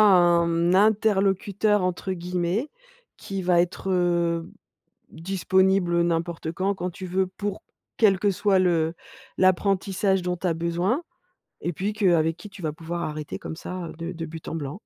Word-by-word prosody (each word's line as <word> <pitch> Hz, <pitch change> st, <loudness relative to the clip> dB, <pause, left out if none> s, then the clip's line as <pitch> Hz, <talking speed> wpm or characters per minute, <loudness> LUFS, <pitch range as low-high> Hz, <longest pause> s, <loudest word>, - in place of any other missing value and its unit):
«un 175 Hz, -3 st, +4 dB
interlocuteur», 205 Hz, -1 st, +2 dB
entre 185 Hz, +1 st, -2 dB
guillemets, 180 Hz, -, -2 dB, 0.5 s
qui 195 Hz, -1 st, -5 dB
va 175 Hz, -1 st, +4 dB
être, 180 Hz, +2 st, -2 dB
heu, 170 Hz, -2 st, +1 dB, 0.6 s
disponible 190 Hz, 0 st, +1 dB
n'importe 165 Hz, -1 st, -1 dB
quand, 190 Hz, +3 st, -1 dB
quand 180 Hz, 0 st, -3 dB
tu 185 Hz, +1 st, -8 dB
veux 185 Hz, +1 st, 0 dB
pour 200 Hz, +2 st, -5 dB, 0.3 s
quel 195 Hz, -4 st, +4 dB
que 205 Hz, -, +2 dB
soit 195 Hz, 0 st, +2 dB
le 165 Hz, -3 st, +2 dB, 0.4 s
l'apprentissage 190 Hz, +1 st, +2 dB
dont 180 Hz, 0 st, -2 dB
tu 185 Hz, -, -6 dB
as 170 Hz, -, +2 dB
besoin, 175 Hz, -, -1 dB, 0.6 s
et 175 Hz, -, -2 dB
puis 195 Hz, +6 st, -2 dB
que 200 Hz, -4 st, +2 dB
avec 165 Hz, 0 st, +1 dB
qui 210 Hz, -, -11 dB
tu 195 Hz, -1 st, -12 dB
vas 155 Hz, -, -1 dB
pouvoir 170 Hz, +2 st, -5 dB
arrêter 150 Hz, -1 st, -5 dB
comme 160 Hz, -, -7 dB
ça, 180 Hz, 0 st, -6 dB
heu, -, -, -8 dB
de 170 Hz, +2 st, -5 dB
de 165 Hz, -1 st, -5 dB
but 160 Hz, 0 st, -9 dB
en -, -, -4 dB
blanc. 150 Hz, +4 st, -5 dB
180 Hz, 165 wpm, -25 LUFS, 170-195 Hz, 0.6 s, un